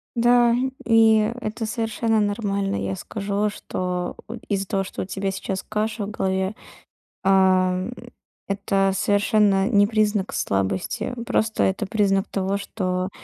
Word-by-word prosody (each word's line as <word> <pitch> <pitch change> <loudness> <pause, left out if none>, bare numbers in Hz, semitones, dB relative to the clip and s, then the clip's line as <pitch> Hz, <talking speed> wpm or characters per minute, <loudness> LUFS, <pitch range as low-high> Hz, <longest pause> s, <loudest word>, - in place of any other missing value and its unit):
Да, 240 0 +4 0.3
и 225 -1 +5
это 220 +1 -3
совершенно 225 0 0
нормально. 200 - -1
Я 95 0 -2
скажу, 205 - -2
что 180 -3 -4
от 230 +1 -8
из-за 195 -2 -1
того, 195 -2 0
что 190 - -6
у - - -3
тебя 195 +1 -3
сейчас 190 0 -4
каша 215 0 -2
в 205 - -6
голове, 190 0 -1 0.7
а, 190 -1 +4
м, 185 +6 -3 0.5
это 195 0 +1
совершенно 205 0 +2
не 205 -3 +4
признак 210 -2 0
слабости. 95 - -1
Просто 220 -2 +1
это 195 +3 0
признак 195 -2 +1
того, 195 0 -1
что 185 -2 -2
200 Hz, 135 wpm, -23 LUFS, 190-215 Hz, 0.7 s, и